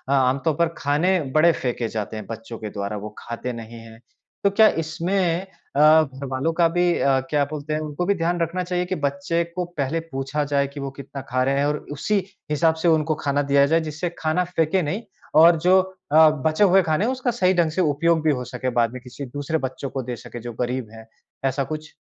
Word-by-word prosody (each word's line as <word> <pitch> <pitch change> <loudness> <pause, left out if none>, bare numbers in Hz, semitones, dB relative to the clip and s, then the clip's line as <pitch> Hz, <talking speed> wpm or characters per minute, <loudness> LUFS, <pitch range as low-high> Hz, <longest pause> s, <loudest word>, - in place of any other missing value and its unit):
आम 130 0 +2
तौर 160 - +3
पर 170 - +4
खाने 165 +6 +2 0.2
बड़े 170 +2 +6
फेंके 125 -5 -2
जाते 110 0 -4
हैं 105 - -7
बच्चों 115 0 -7
के 110 - -5
द्वारा 100 +1 -4
वो 105 +1 -7
खाते 120 +1 -5
नहीं 115 0 -9
हैं। 115 0 -13 0.4
तो 200 - +5
क्या 215 +2 +6 0.2
इसमें 175 +2 -1 0.3
अ, 145 - +3 0.2
घरवालों 135 +1 -3
का 170 0 +4
भी 175 +1 +1 0.2
अ, 135 -1 +3
क्या 145 -1 +2
बोलते 150 +1 -5
हैं? 155 - 0
उनको 155 +3 -3
भी 200 +2 +2
ध्यान 175 0 -1
रखना 170 +2 -1
चाहिए 180 0 -1
कि 185 - -2
बच्चे 140 +5 0
को 180 -1 -1
पहले 145 +3 0
पूछा 135 +3 -2
जाए 140 0 +2
कि 140 +1 -9
वो 140 0 -3
कितना 135 0 -8
खा 130 +1 +1
रहे 135 +1 +1
हैं, 140 - +2
और 150 +1 0 0.2
उसी 205 +8 0 0.3
हिसाब 160 +2 +3
से - - +3
उनको 160 -1 +2
खाना 145 0 +1
दिया 140 0 +6
जाए 160 +3 +3
जिससे 160 +3 -3
खाना 155 +3 +1
फेंके 165 +4 +2
नहीं 180 +8 -3 0.4
और 170 0 +7
जो 190 +1 +7 0.3
अ, 155 0 +8 0.2
बचे 155 +6 +3
हुए 195 -1 +6
खाने 160 +5 +1
हैं 250 - +1
उसका 255 -1 -1
सही 185 -6 +2
ढंग 170 -3 +2
से 185 - 0
उपयोग 160 +1 +2
भी 155 - +3
हो 125 - -3
सके 130 0 -3
बाद 115 0 +2
में 130 - -7
किसी 130 +3 -8
दूसरे 145 +5 -3
बच्चों 130 +1 -7
को 135 - -3
दे 120 0 -4
सके 120 +1 -9
जो 120 +1 -6
गरीब 125 -2 -2
हैं, 110 0 -12 0.4
ऐसा 135 +1 0
कुछ? 155 +2 -7
150 Hz, 225 wpm, -23 LUFS, 130-170 Hz, 0.4 s, अ